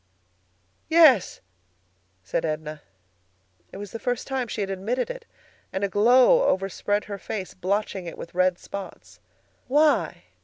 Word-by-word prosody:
"Yes," 315 - +5 0.8
said 90 - -2
Edna. 155 -1 -4 0.9
It - - -9
was 205 -1 -8
the 230 - -6
first 245 +2 -2
time 265 -2 -2
she 220 - -4
had 195 -1 -2
admitted 230 - -2
it, - - -9 0.5
and 190 - -3
a 200 - +1
glow 250 - +5
overspread 195 +2 0
her 200 -1 -7
face, 190 -2 -5
blotching 190 0 -2
it 170 - -7
with 170 - -9
red 185 0 +2
spots. 95 - -9 0.5
"Why?" 295 +3 +2
200 Hz, 140 wpm, -25 LUFS, 185-250 Hz, 0.9 s, Yes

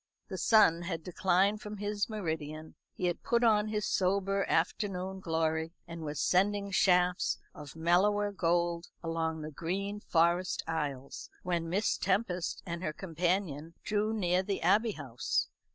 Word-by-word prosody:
The - - -4
sun 205 -7 +5
had 170 -2 -4
declined 190 +3 +2
from 210 0 -7
his 205 +1 -2
meridian; 160 -6 -4 0.2
he 180 - -2
had 175 0 -1
put 235 0 +1
on 215 -2 +4
his 210 -1 -1
sober 195 +1 +1
afternoon 190 -1 0
glory, 160 -2 -1
and 165 0 -7
was 150 -1 -4
sending 200 +2 +2
shafts 180 -1 +3 0.2
of 145 0 -10
mellower 200 +5 +3
gold 170 -2 0 0.2
along 165 -1 -2
the 155 - -6
green 195 +7 -3
forest 170 0 +1
aisles, 145 -5 -4
when 170 -2 -1
Miss 200 +5 +1
Tempest 185 -2 -1
and 170 -1 -4
her 155 -4 -2
companion 170 -2 -2
drew 210 +1 0
near 185 -4 +1
the 195 +1 -3
Abbey 220 +1 +3
House. 130 -7 -2
180 Hz, 145 wpm, -31 LUFS, 165-200 Hz, 0.2 s, sun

